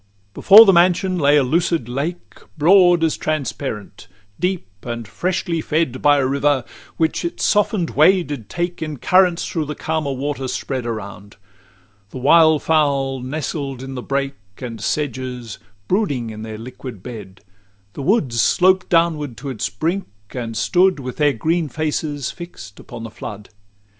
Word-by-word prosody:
LVII 100 0 -40
Before 215 +3 +8
the 195 - +5
mansion 180 +1 +3
lay 145 0 +4
a 145 - +4
lucid 165 -1 0
lake, 145 +8 -4 0.2
Broad 175 +1 +5
as 160 - +1
transparent, 135 -9 -4 0.3
deep, 180 -1 -1 0.2
and 120 -2 -6
freshly 175 - -2
fed 155 -5 -1
By 145 0 +5
a 135 - +1
river, 140 0 +1 0.3
which 160 +2 0
its 170 - -4
soften'd 205 -4 +1
way 180 +5 +4
did 135 -8 -7
take 175 0 -3
In 155 -2 -4
currents 180 +4 +3
through 160 -3 -2
the 150 +1 -5
calmer 155 -3 -2
water 135 0 -3
spread 130 -1 -3
Around: 100 -3 -7 0.7
the 130 - -9
wildfowl 145 -2 +3
nestled 135 -1 -4
in 135 0 -7
the 125 - -5
brake 140 +1 -2 0.2
And 115 -4 -7
sedges, 130 -5 -3 0.3
brooding 145 - 0
in 110 0 -8
their 110 -1 -7
liquid 120 -3 -9
bed: 105 -6 -9 0.5
The - - -7
woods 135 - +1
sloped 185 0 +3
downwards 160 -6 +1
to 140 - -4
its 110 -7 -3
brink, 165 - -2 0.2
and 115 -3 -5
stood 185 -2 +2
With 130 -2 -6
their 150 -2 +3
green 160 +6 -1
faces 150 -1 -2
fix'd 170 - -11
upon 120 -2 -9
the 115 - -7
flood. 105 -1 -9
145 Hz, 155 wpm, -20 LUFS, 125-170 Hz, 0.7 s, Before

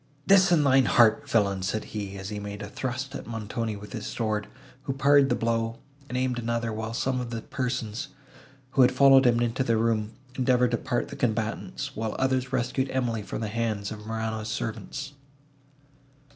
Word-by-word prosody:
"This 195 0 +6
in 160 -4 +5
thine 135 -1 +5
heart, 120 +5 +4
villain!" 100 -6 +2
said 95 +4 -1
he, 100 -2 -4
as 95 +1 -6
he 105 -1 -4
made 100 0 -6
a - - -5
thrust 130 +4 -4
at - - -7
Montoni 115 0 -3
with 105 +3 -10
his 110 -3 -5
sword, 110 -3 -2 0.4
who 135 - -1
parried 140 +1 +5
the - - +2
blow, 115 0 -1 0.3
and 125 - -2
aimed 125 -1 0
another, 115 -1 -1
while 110 +1 -4
some 130 +1 0
of 120 - -5
the 115 -1 -5
persons, 125 -5 -3 0.6
who 135 - +3
had 125 0 +6
followed 135 0 +6
him 120 -1 +4
into 120 +2 0
the 115 -3 +2
room, 110 -1 0 0.2
endeavoured 125 -1 +3
to 120 - +2
part 125 -1 -2
the - - -7
combatants, 120 +6 -2
and 110 0 -2
others 130 -1 0
rescued 130 +1 0
Emily 120 -4 -1
from 100 +2 -5
the 110 - -1
hands 110 -2 -2
of 105 0 -8
Morano's 110 -1 -3
servants. 135 +6 -4
115 Hz, 185 wpm, -27 LUFS, 110-130 Hz, 0.6 s, This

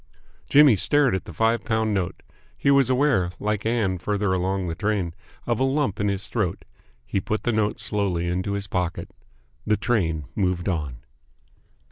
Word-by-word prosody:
Jimmy 145 -5 +7
stared 145 +5 +3
at 95 - -2
the - - -8
five 115 +7 +1
pound 110 -1 0
note. 95 -3 -2 0.3
He 140 - +2
was 135 -2 +4
aware, 130 -9 +2
like 105 0 -1
Ann 105 -6 0
farther 100 +1 0
along 95 +1 -1
the 85 - -2
train, 100 -2 -1 0.3
of 120 -2 0
a - - +2
lump 135 -5 0
in 105 - +1
his 100 +1 -1
throat. 105 -8 -2 0.4
He 95 +10 -1
put 110 +3 -3
the 120 - +1
note 105 -1 0
slowly 95 -5 -1
into 95 +3 -1
his 100 0 -3
pocket. 90 -3 -3 0.5
The 105 - +1
train 80 - 0
moved 90 -3 -1
on. 75 -9 -2
100 Hz, 170 wpm, -24 LUFS, 90-115 Hz, 0.5 s, Jimmy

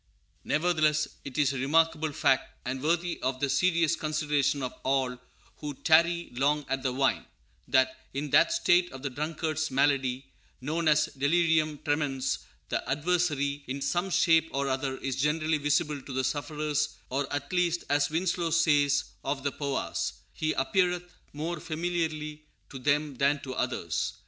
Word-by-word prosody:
Nevertheless 155 -2 +2 0.2
it 140 - -7
is 140 -2 +3
a 135 - -3
remarkable 160 +2 +2
fact, 130 -1 +1
and 130 +1 -3
worthy 170 +3 0
of 130 0 -1
the 140 -1 0
serious 170 -3 +3
consideration 150 -3 0
of 125 - -3
all 130 -1 0 0.4
who 145 -2 -6
"tarry 170 +3 +3
long 145 +3 +1
at 135 0 -1
the 130 -1 0
wine," 135 +1 0 0.4
that, 130 0 +3 0.2
in 140 +1 -4
that - - +5
state 180 - +3
of 135 0 -9
the 140 - -2
drunkard's 155 +2 -2
malady 135 -1 +1 0.3
known 155 +5 -2
as 155 0 +5
delirium 155 +1 +2
tremens, 145 -3 0 0.3
the - - 0
adversary, 145 -2 0
in 135 +2 -3
some 175 +7 -1
shape 165 -2 +4
or 140 0 -1
other, 130 0 -1
is 135 -1 -3
generally 155 +1 +1
visible 145 0 0
to 135 - -9
the 130 0 0
sufferers, 150 +2 -1 0.2
or 140 +1 -1
at 145 +4 -4
least, 175 -1 +1
as 145 +1 +2
Winslow 170 +1 0
says 145 -3 +3 0.2
of 135 -2 -2
the 140 - 0
Powahs, 140 -1 -2 0.2
"he 155 0 -1
appeareth 180 +4 0 0.2
more 160 +3 -4
familiarly 155 -2 -3 0.3
to 135 - -8
them 145 +1 0
than 140 +2 +2
to 130 - -6
others." - - -2
150 Hz, 155 wpm, -28 LUFS, 135-165 Hz, 0.4 s, that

